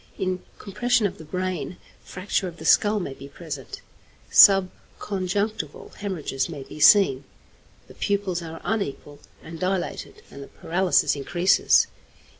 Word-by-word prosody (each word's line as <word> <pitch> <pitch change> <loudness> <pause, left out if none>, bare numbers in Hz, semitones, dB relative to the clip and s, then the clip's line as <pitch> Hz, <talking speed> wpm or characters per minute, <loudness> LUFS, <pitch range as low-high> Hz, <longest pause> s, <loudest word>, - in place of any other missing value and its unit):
In 185 -1 -2 0.2
compression 235 +3 0
of 200 - -3
the - - -9
brain, 180 +2 -4 0.3
fracture 185 +1 -3
of 170 -1 -9
the 160 - -10
skull 210 +5 +4
may 160 -8 -5
be 135 +1 -11
present, 140 -3 -8 0.5
subconjunctival 195 +1 +2
hæmorrhages 170 -8 -3
may 145 -5 -7
be 155 - -12
seen, 150 -5 +5 0.6
the - - -14
pupils 195 -3 -2
are 165 -1 -8
unequal 150 -9 -4 0.2
and 165 0 -9
dilated, 185 0 -3
and 140 - -10
the 140 - -9
paralysis 180 0 +1
increases. 175 +7 +3
180 Hz, 130 wpm, -24 LUFS, 155-195 Hz, 0.6 s, seen